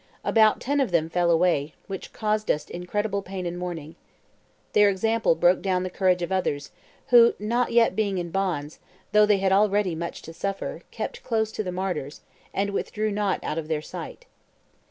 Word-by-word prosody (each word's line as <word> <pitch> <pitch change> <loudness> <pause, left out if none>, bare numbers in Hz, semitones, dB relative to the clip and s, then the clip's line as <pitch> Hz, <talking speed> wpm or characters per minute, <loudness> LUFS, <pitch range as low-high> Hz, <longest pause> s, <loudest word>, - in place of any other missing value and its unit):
About 220 -1 +4
ten 285 +2 0
of 270 - +2
them 165 -2 +1
fell 175 0 +2
away, 165 -3 +2
which 195 -2 -7
caused 215 0 -1
us 150 - 0
incredible 200 +3 -2
pain 190 -1 -6
and 175 0 -3
mourning. 170 -3 -5 0.8
Their 205 -1 +6
example 220 -1 +1
broke 175 +2 +3
down 185 -2 0
the 185 - -4
courage 180 -2 +2
of 175 - -4
others, 145 -7 -1 0.4
who, 235 -1 +7
not 235 +4 0
being 220 -4 +2
yet - - 0
in 170 - -9
bonds, 170 -6 -2 0.3
though 210 0 +5
they 210 -1 +4
had 190 0 +1
already 205 -1 +3
had 160 - -5
much 170 0 -5
to 165 - -9
suffer, 195 +4 -4
kept - - -5
close 220 -2 0
to 215 - -3
the 180 - -4
martyrs, 180 -6 -4 0.3
and 200 +1 -1
withdrew 215 +2 -2
not 205 -1 -1
out 155 - -2
of 155 - -6
their 155 -1 -2
sight. - - -8
190 Hz, 190 wpm, -25 LUFS, 175-210 Hz, 0.8 s, who